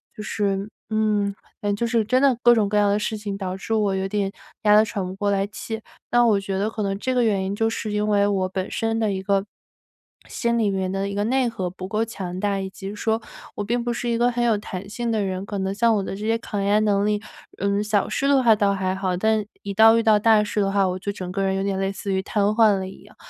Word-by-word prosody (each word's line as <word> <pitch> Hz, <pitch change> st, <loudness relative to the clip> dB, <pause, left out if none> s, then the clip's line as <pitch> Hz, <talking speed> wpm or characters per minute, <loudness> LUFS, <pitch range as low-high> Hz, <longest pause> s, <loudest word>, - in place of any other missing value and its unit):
就 210 Hz, -, -7 dB
是 200 Hz, -1 st, -1 dB, 0.2 s
嗯， 210 Hz, -2 st, +1 dB, 0.3 s
感 205 Hz, -1 st, 0 dB
觉 205 Hz, -, -13 dB
就 -, -, +3 dB
是 230 Hz, -1 st, +1 dB
真 255 Hz, +4 st, +2 dB
的 270 Hz, -4 st, +4 dB
各 240 Hz, 0 st, +7 dB
种 210 Hz, -3 st, +2 dB
各 210 Hz, -, +1 dB
样 205 Hz, -1 st, +4 dB
的 200 Hz, -, +2 dB
事 215 Hz, +1 st, -2 dB
情， 205 Hz, -2 st, -5 dB
导 190 Hz, -1 st, -4 dB
致 210 Hz, +3 st, -4 dB
我 210 Hz, -3 st, +2 dB
有 190 Hz, 0 st, -1 dB
点 200 Hz, -1 st, -1 dB, 0.3 s
压 210 Hz, -1 st, +6 dB
得 215 Hz, -, +5 dB
喘 210 Hz, -4 st, -3 dB
不 180 Hz, -, -5 dB
过 205 Hz, +1 st, -1 dB
来 195 Hz, 0 st, +1 dB
气。 220 Hz, +1 st, -6 dB, 0.3 s
那 240 Hz, 0 st, +5 dB
我 215 Hz, -4 st, +4 dB
觉 195 Hz, -1 st, -3 dB
得 205 Hz, +3 st, 0 dB
可 220 Hz, -, -5 dB
能 195 Hz, -1 st, -1 dB
这 255 Hz, +5 st, -2 dB
个 250 Hz, -1 st, +2 dB
原 200 Hz, -3 st, +1 dB
因 195 Hz, -, -2 dB
就 225 Hz, +2 st, +1 dB
是 225 Hz, -1 st, -4 dB
因 210 Hz, 0 st, 0 dB
为 205 Hz, -1 st, +3 dB
我 195 Hz, -2 st, 0 dB
本 190 Hz, 0 st, -4 dB
身 225 Hz, 0 st, -1 dB
的 215 Hz, -2 st, +1 dB
一 190 Hz, -1 st, -3 dB
个 195 Hz, 0 st, +1 dB, 0.8 s
心 235 Hz, -1 st, -1 dB
里 220 Hz, -3 st, +2 dB
面 190 Hz, -1 st, -1 dB
的 195 Hz, +1 st, -2 dB
一 200 Hz, -, -5 dB
个 205 Hz, -, 0 dB
内 255 Hz, +2 st, +2 dB
核 195 Hz, -6 st, -3 dB
不 185 Hz, +1 st, -8 dB
够 215 Hz, +3 st, 0 dB
强 190 Hz, -5 st, -5 dB
大， 200 Hz, 0 st, 0 dB
以 190 Hz, 0 st, -4 dB
及 195 Hz, +1 st, -7 dB
说 220 Hz, +2 st, 0 dB, 0.3 s
我 205 Hz, -, -3 dB
并 235 Hz, +4 st, -1 dB
不 240 Hz, 0 st, -1 dB
是 240 Hz, 0 st, -3 dB
一 230 Hz, -, +1 dB
个 240 Hz, +1 st, +3 dB
很 240 Hz, 0 st, -1 dB
有 230 Hz, -3 st, +3 dB
弹 200 Hz, -1 st, -7 dB
性 235 Hz, +2 st, -3 dB
的 215 Hz, -2 st, 0 dB
人， 190 Hz, 0 st, -3 dB
可 205 Hz, 0 st, -5 dB
能 190 Hz, 0 st, -1 dB
像 230 Hz, +2 st, +3 dB
我 200 Hz, -, 0 dB
的 190 Hz, -, -5 dB
这 210 Hz, +2 st, -6 dB
些 225 Hz, +1 st, +2 dB
抗 210 Hz, -3 st, -4 dB
压 205 Hz, +1 st, +3 dB
能 205 Hz, -2 st, +2 dB
力， 210 Hz, 0 st, 0 dB, 0.4 s
嗯， 200 Hz, +1 st, +1 dB
小 210 Hz, -1 st, 0 dB
事 275 Hz, -, 0 dB
的 275 Hz, -2 st, +4 dB
话 225 Hz, -2 st, +6 dB
倒 200 Hz, -1 st, +2 dB
还 190 Hz, -1 st, -1 dB
好， 190 Hz, -1 st, -1 dB
但 220 Hz, +2 st, +1 dB, 0.2 s
一 200 Hz, -, -4 dB
到 220 Hz, +2 st, +7 dB
遇 230 Hz, -, +1 dB
到 220 Hz, -2 st, +5 dB
大 215 Hz, 0 st, +5 dB
事 210 Hz, -, -2 dB
的 195 Hz, -1 st, +1 dB
话， 195 Hz, -1 st, +2 dB
我 185 Hz, 0 st, -3 dB
就 200 Hz, -, -3 dB
整 185 Hz, -3 st, -6 dB
个 195 Hz, +1 st, -1 dB
人 190 Hz, 0 st, +1 dB
有 195 Hz, -, -1 dB
点 195 Hz, -1 st, -1 dB
类 195 Hz, 0 st, 0 dB
似 195 Hz, 0 st, -5 dB
于 190 Hz, -, +1 dB
瘫 205 Hz, +1 st, -1 dB
痪 215 Hz, +1 st, +4 dB
了 190 Hz, 0 st, -4 dB
一 190 Hz, -, -13 dB
样， -, -, -18 dB
205 Hz, 305 characters per minute, -23 LUFS, 195-220 Hz, 0.8 s, 各